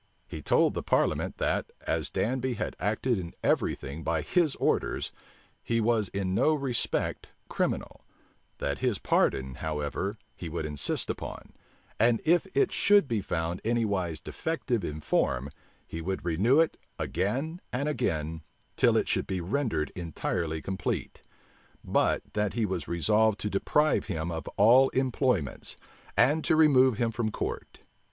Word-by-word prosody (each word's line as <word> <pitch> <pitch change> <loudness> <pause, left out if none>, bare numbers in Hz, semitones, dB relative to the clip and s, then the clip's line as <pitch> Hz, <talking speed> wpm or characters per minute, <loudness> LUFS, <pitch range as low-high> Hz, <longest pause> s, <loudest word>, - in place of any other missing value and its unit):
He - - -7
told - - +3
the - - -2
parliament, - - +1
that, - - -1
as - - -1
Danby 130 +1 -1
had - - -3
acted 110 +2 0
in 85 -2 -7
every - - +2
thing 70 +4 -7
by 80 0 -1
his 165 - +2
orders, - - 0 0.5
he 115 0 0
was 110 -2 +2
in 95 -1 -2
no 155 +10 +3
respect 135 -5 -1 0.2
criminal; - - -2 0.5
that 70 - -2
his 125 -6 +1
pardon, 65 -6 +1
however, 80 +6 -2 0.2
he 85 - -6
would 80 -1 -3
insist 75 -2 -1
upon; - - -8 0.5
and 115 +1 +4
if 170 +2 +3
it 405 -2 +4
should 205 -6 +4
be 115 -4 0
found 85 -1 -2
anywise 100 -8 0
defective 130 - -2
in 75 -1 -4
form, 70 -1 0 0.3
he 80 - -6
would 95 +1 -3
renew 100 - +3
it 165 - +2 0.2
again 140 - -2
and 140 +4 -1
again, 80 - -1 0.3
till - - +4
it - - +1
should - - 0
be 95 - -2
rendered 90 - -1
entirely 80 -1 -3
complete; 95 -1 -3 0.6
but - - +1
that 105 -1 0
he 115 -2 +1
was 95 -6 -3
resolved 105 +5 +2
to 105 - -3
deprive 150 +10 +2
him 80 +1 -3
of 80 -1 -5
all 125 +6 +7
employments, 125 - 0 0.4
and 150 +4 +4
to - - +3
remove 130 -6 +5
him 115 -1 +1
from 110 0 -1
court. - - -5
105 Hz, 150 wpm, -28 LUFS, 85-130 Hz, 0.6 s, all